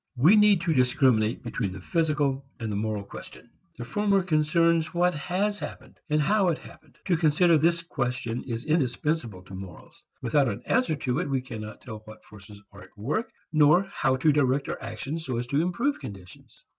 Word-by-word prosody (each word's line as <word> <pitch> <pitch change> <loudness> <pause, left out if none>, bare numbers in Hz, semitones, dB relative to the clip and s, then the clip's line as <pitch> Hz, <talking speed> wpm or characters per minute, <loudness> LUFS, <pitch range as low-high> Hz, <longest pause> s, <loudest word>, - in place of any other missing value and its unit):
We 155 - +6
need 210 -4 +5
to 170 -1 +1
discriminate 125 -4 +2
between 105 -5 -3
the 95 - -8
physical 150 - 0 0.2
and 110 -3 -3
the - - -2
moral 105 0 -2
question. 100 - -11 0.3
The 120 - -6
former 200 - +1
concerns 165 0 +2
what 180 +1 +3
has 195 +7 -1
happened, - - -9
and 150 0 +2
how 195 +5 +2
it 165 -3 +1
happened. - - -16
To 180 - +2
consider 160 +1 +4
this 165 +2 +2
question 125 -6 -3
is 115 -2 -4
indispensable 135 - -1
to 95 - -13
morals. 95 -3 -11 0.2
Without 135 +3 +2
an 100 - -5
answer 255 -11 +1
to 130 -1 -1
it 175 - -2
we 135 -1 +1
cannot 110 -4 -8
tell 110 -5 -8
what 110 - -13
forces 105 0 -13
are 100 0 -13
at - - -17
work 150 - -2 0.2
nor 155 +4 +5
how 135 -2 +1
to 140 +4 +3
direct 140 -1 +1
our - - -4
actions 135 +10 -5
so 130 -5 -3
as 120 - -2
to 140 +5 +1
improve 235 - 0
conditions. 95 -3 -12
140 Hz, 190 wpm, -26 LUFS, 115-170 Hz, 0.3 s, We